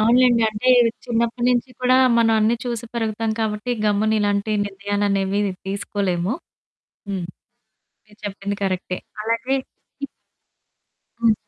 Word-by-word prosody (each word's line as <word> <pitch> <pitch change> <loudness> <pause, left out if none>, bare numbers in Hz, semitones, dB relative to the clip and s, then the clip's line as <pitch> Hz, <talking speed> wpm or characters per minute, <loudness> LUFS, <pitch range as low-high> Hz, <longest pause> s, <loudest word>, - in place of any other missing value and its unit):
అవునులెండి. 240 +1 +5
అంటే 215 +4 -2 0.4
చిన్నప్పడి 235 0 0
నుంచి 245 +1 0
కూడా 255 0 +4 0.2
మనం 225 -1 +4
అన్నీ 225 +2 +3
చూసి 235 -1 -3
పెరుగుతాం 225 -1 -1
కాబట్టి, 215 +2 -2
గమ్మున 210 +1 +2
ఇలాంటి 205 +1 0
నిర్ణయాలనేవి 200 0 0 0.3
తీసుకోలేము. 195 0 -1 0.7
హ్మ్. 190 -3 -2 0.8
మీరు 210 0 -21
చెప్పింది 200 0 -4
కరెక్టే. 185 -1 -2 0.2
అలాగే 230 +4 0
హ్మ్. 280 - -11 1.1
హ్మ్. 230 -2 +4
215 Hz, 110 wpm, -22 LUFS, 200-235 Hz, 1.1 s, అవునులెండి